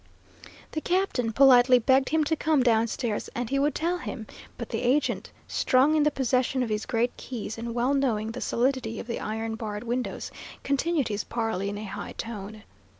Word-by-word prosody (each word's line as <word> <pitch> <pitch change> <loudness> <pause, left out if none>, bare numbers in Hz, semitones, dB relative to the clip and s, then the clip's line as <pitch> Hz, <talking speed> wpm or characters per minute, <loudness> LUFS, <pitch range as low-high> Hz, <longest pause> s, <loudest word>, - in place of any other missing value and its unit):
The 310 - -3
captain 350 -11 0
politely 250 0 +7
begged 260 +2 +3
him 315 0 +2
to 320 +2 +1
come 305 -3 +2
downstairs 230 -1 0
and 240 0 -3
he 275 - +2
would 290 +2 +1
tell 345 +3 0
him; 230 -9 -6 0.3
but 235 - -6
the 225 - -2
agent, 255 +4 +1 0.2
strong 265 +4 +3
in 310 - +3
the 300 - +4
possession 260 -1 +1
of 235 - -3
his 215 0 -2
great 235 +1 0
keys, 230 -4 -6
and 230 0 -5
well 245 +3 +2
knowing 225 -6 0
the 250 - -6
solidity 245 -2 0
of - - -6
the 235 - -4
iron 220 +1 -3
barred 215 -2 -5
windows, 245 +1 -3 0.3
continued 280 0 0
his 205 -1 -2
parley 225 -4 -2
in 205 - -4
a 210 - -6
high 195 - -6
tone. 215 -1 -7
245 Hz, 190 wpm, -27 LUFS, 225-275 Hz, 0.3 s, politely